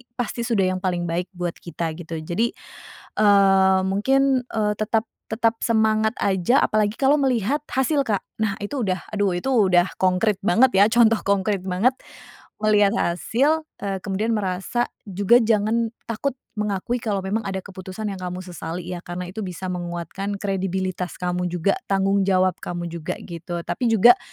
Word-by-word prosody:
pasti 245 -1 -3
sudah 220 -6 +1
yang 185 - -2
paling 180 -2 -1
baik 175 +1 -2
buat 175 -1 -2
kita, 170 -1 -4
gitu. 165 -1 -6
Jadi, 220 +9 -1 0.6
eee, 195 -2 +5
mungkin, 265 +6 +2
eee, 210 -1 +1
tetap 220 +1 0 0.2
tetap 225 +1 0
semangat 220 -1 +2
aja, 195 +6 +2
apalagi 215 0 +1
kalau 275 +2 +5
melihat 265 -1 +1
hasil, 275 +2 +1
Kak. 210 -5 0 0.2
Nah, 200 -1 -2
itu 230 +4 -3
udah 185 -2 -2
aduh, 205 -3 0
itu 175 +9 -3
udah 190 -7 +4
konkrit 185 +3 +2
banget, 235 +4 +5
ya, 200 - +7
contoh 230 -1 +5
konkrit 200 -1 0
banget, 195 +8 +1 0.6
melihat 210 -1 +4
hasil, 260 - +1 0.2
eee, 195 -2 -4
kemudian 210 +3 -1
merasa 195 +4 -1 0.2
juga 200 +4 +4
jangan 225 0 +1 0.2
takut 245 +4 -2 0.2
mengakui 210 +4 -1
kalau 205 -4 -2
memang 205 +3 -2
ada 190 -1 -3
keputusan 190 +2 -6
yang 195 - -6
kamu 180 0 -5
sesali, 175 -1 -6
ya, 180 - -4
karena 175 +1 -6
itu 205 +1 -5
bisa 180 +1 -5
menguatkan 175 +3 -4
kredibilitas 190 -2 -2
kamu 180 0 -2
juga, 175 +2 0
tanggung 195 0 +2
jawab 185 -1 +2
kamu 175 -1 -5
juga, 165 -2 -4
gitu, 170 0 -6
tapi 245 - -2
juga 235 +3 +6
200 Hz, 160 wpm, -23 LUFS, 180-225 Hz, 0.6 s, ya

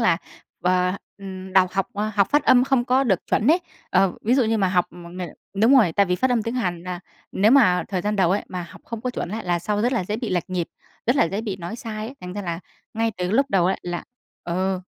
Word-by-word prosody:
là, 225 -8 +4 0.5
ờ, 180 0 +2 0.3
ừm, 190 -1 -8
đọc 185 -1 +4
học 195 -1 0 0.3
học 200 -2 +3
phát 295 0 +3
âm 250 0 +6
không 265 -3 +2
có 260 +2 +3
được 195 -8 +2
chuẩn 220 - +2
ấy. 345 +3 +4 0.3
Ờ, 190 0 +3
ví 235 +4 +3
dụ 260 -2 +3
như 225 0 +1
mà 195 -2 +2
học 180 -1 +2
một 175 -1 -11
mình 180 -2 -5 0.2
đúng 225 +7 +5
rồi, 210 -11 +5
tại 200 +2 +3
vì 180 - +1
phát 260 +8 +1
âm 235 -3 +2
tiếng 230 +2 -3
Hàn 180 -9 -2
là 180 -1 -5 0.3
nếu 205 +3 +4
mà 230 -10 +5
thời 190 -3 -1
gian 210 +2 -1
đầu 185 -3 +3
ấy, 200 +2 +1
mà 180 -1 -4
học - - -13
không 230 -1 -6
có 250 +2 -2
chuẩn 210 - -4
ấy, 220 +3 -5
là 175 -1 +1
sau 205 +4 -1
rất 245 +3 +2
là 235 - 0
dễ 210 +4 -2
bị 235 0 -4
lệch 180 0 -1
nhịp, 180 -2 -1 0.4
rất 245 - +3
là 260 - +5
dễ 195 +4 -2
bị 205 -4 -4
nói 180 +5 -6
sai 220 -3 -5
ấy. 260 - -8
Thành 180 0 -7
ra 205 +1 -4
là 170 -1 -3 0.3
ngay 225 0 +1
từ 180 0 -1
lúc 270 +6 +3
đầu 180 -5 +3
ấy, 190 - +1
là 175 0 -4 0.4
ờ, 185 +2 -1
195 Hz, 270 wpm, -23 LUFS, 180-230 Hz, 0.5 s, âm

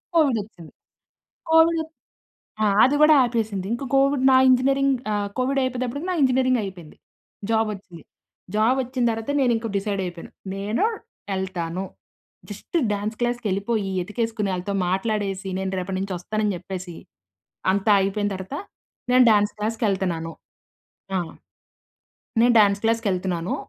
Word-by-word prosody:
Covid 285 -8 +4
వచ్చేసింది. 180 -6 -14 0.8
Covid 325 0 +5 0.8
ఆ! - - +4 0.2
అది 275 +3 +4
కూడా 305 0 +7
ఆపేసింది. 220 -5 -2
ఇంక 240 - -4
కోవిడ్ 275 -1 +3
నా 260 - +6
ఇంజినీరింగ్ 270 +1 +3 0.2
ఆహ్, 205 -1 -1
కోవిడ్ 270 +2 +1
అయిపోయేటప్పటికి 255 +5 -3
నా - - -1
ఇంజినీరింగ్ 255 -1 +3
అయిపోయింది. 180 -5 -9 0.5
జాబ్ 220 0 +2
వచ్చింది. 180 -5 -12 0.5
జాబ్ 230 +5 +3
వచ్చిన 255 0 -3
తర్వాత 225 +4 -3
నేను 245 -2 +3
ఇంకా 225 0 -4
డిసైడ్ 200 -1 -2
అయిపోయాను. 175 -1 -8 0.2
నేను 210 - 0 0.5
ఎళ్తాను. 185 -1 -3 0.7
జస్ట్ 345 - -4 0.2
డ్యాన్స్ 210 +2 -3
క్లాస్‌కెళ్ళిపోయి 215 -3 -1
ఎతికేసుకుని 215 0 -2
ఆళ్ళతో 185 +2 -3
మాట్లాడేసి 195 0 -1
నేను 190 0 -2
రేపటి 185 +1 -3
నుంచి 195 -1 -3
వస్తానని 210 +3 -1
చెప్పేసి 180 -1 -7 0.8
అంతా 200 +2 +1
అయిపోయిన 205 +1 0
తర్వాత 190 +9 -7 0.6
నేను 255 0 +6
డ్యాన్స్ 205 -1 +3
క్లాస్‌కెళ్తున్నాను. 195 -7 -1 0.9
ఆ! - - +2 1.2
నేను 240 +1 +5
డాన్స్ 200 -1 +3
క్లాస్‌కెళ్తున్నాను. 190 -6 0
210 Hz, 125 wpm, -23 LUFS, 190-250 Hz, 1.2 s, కూడా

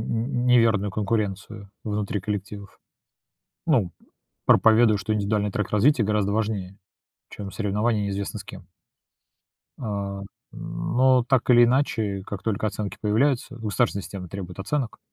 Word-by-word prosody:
нь 120 +2 -2
неверную 115 -5 +4
конкуренцию 100 -1 -3
внутри 105 -1 -2
коллективов. 100 0 -6 0.9
Ну, 115 - +2 0.5
проповедуют, 110 -2 +5
что 110 +2 -1
индивидуальный 105 0 0
трек 105 0 -2
развития 115 +4 +3
гораздо 105 -1 +1
важнее, 105 -3 -2 0.5
чем 100 -1 -7
соревнование 105 +1 0
неизвестно 100 0 -3
с - - -8
кем. 90 - -11 1.1
А, 100 -3 -4 0.3
но, 130 0 +1
так 130 -1 +1
или 120 -1 +8
иначе, 115 -6 0
как 100 -2 -6
только 110 -1 -1
оценки 100 0 -4
появляются, 125 +5 +1
государственная 110 -2 0
система 90 -2 -8
требует 95 -1 -7
оценок. 125 +4 -2
105 Hz, 125 wpm, -25 LUFS, 100-115 Hz, 1.1 s, или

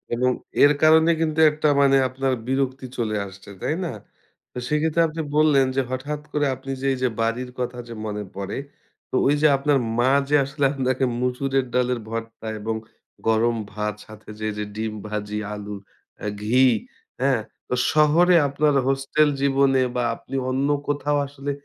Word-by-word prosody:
এবং 125 +1 +2 0.3
এর 145 - +7
কারণে 160 +1 +6
কিন্তু 160 -1 0
একটা 150 0 0
মানে 135 -1 +5
আপনার 130 +1 -1
বিরক্তি 130 0 -1
চলে 110 -3 -1
আসছে, 95 +1 -13
তাই 155 - 0
না? - - -3 0.6
তো - - -11
সেক্ষেত্রে 155 +3 +1
আপনি 160 +1 -4
বললেন 150 -3 +5
যে 135 - +3
হঠাৎ 145 +3 -3
করে 150 -1 +1
আপনি 135 +1 -7
যে 135 - -3
এই - - -3
যে 125 - +3
বাড়ির 115 +3 -1
কথা 125 0 -3
যে 115 - -7
মনে 105 -1 -3
পড়ে। 100 0 -4 0.5
তো - - -4
ওই 145 - +4
যে 155 - +6
আপনার 140 +1 +2 0.2
মা 125 +2 +4 0.2
যে 150 - +4
আসলে 140 +1 -1
আপনাকে 130 -1 0 0.2
মসুরের 130 +1 0
ডালের 125 -1 +1
ভর্তা 115 0 -6
এবং 110 +2 -2 0.5
গরম 115 +1 +3 0.2
ভাত 105 0 -2
সাথে 110 -1 -14
যে - - -6
এই - - -3
যে 105 - -2
ডিম 110 0 -3
ভাজি, 105 0 -4 0.2
আলু, 105 0 -6 0.5
আ - - -1
ঘি, 125 +5 +4 0.6
হ্যাঁ? 130 -4 +2 0.3
তো - - -3 0.2
শহরে 160 +4 +5
আপনার 145 +2 +1
হোস্টেল 135 +3 +2
জীবনে 135 -1 +3 0.2
বা 125 - +1
আপনি 135 - -9
অন্য 135 +2 0 0.2
কোথাও 145 0 0
আসলে 140 0 -5
135 Hz, 170 wpm, -23 LUFS, 115-145 Hz, 0.6 s, এর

